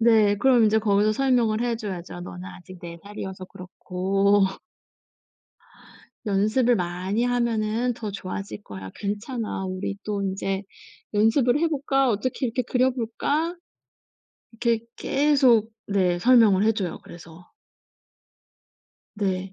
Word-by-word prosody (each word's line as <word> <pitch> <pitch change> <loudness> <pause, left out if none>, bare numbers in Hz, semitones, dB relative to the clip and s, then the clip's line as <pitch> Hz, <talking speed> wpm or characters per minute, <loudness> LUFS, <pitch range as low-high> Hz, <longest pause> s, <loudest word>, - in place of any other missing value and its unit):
네, 220 -3 +4
그럼 250 -4 +5
이제 220 +1 +4
거기서 210 0 +2
설명을 235 -3 +2
해 240 -1 0
줘야죠. 185 -5 -6
"너는 180 0 -8
아직 185 0 -11
4 170 -1 -8
살이어서 190 -2 -7
그렇고" 190 +2 0 1.8
"연습을 215 +5 +2
많이 185 +5 -1
하면은 235 -1 0
더 215 -2 -5
좋아질 195 +1 -6
거야. 95 - -9
괜찮아. 210 0 -4
우리 185 +1 -4
또 205 -1 -2
인제 195 0 -2 0.5
연습을 235 +5 +3
해 335 +2 +2
볼까? 275 -3 +1
어떻게 255 +5 -1
이렇게 250 +2 -1
그려 255 +1 +2
볼까?" 285 +8 -2 1.0
이렇게 230 -1 0
계속 265 -6 +3 0.2
네 185 -3 +1
설명을 220 -3 +5
해 220 - +4
줘요, 190 -5 -3
그래서. 170 +1 -13 1.7
네. 190 -2 -2
215 Hz, 245 characters per minute, -24 LUFS, 190-240 Hz, 1.8 s, 그럼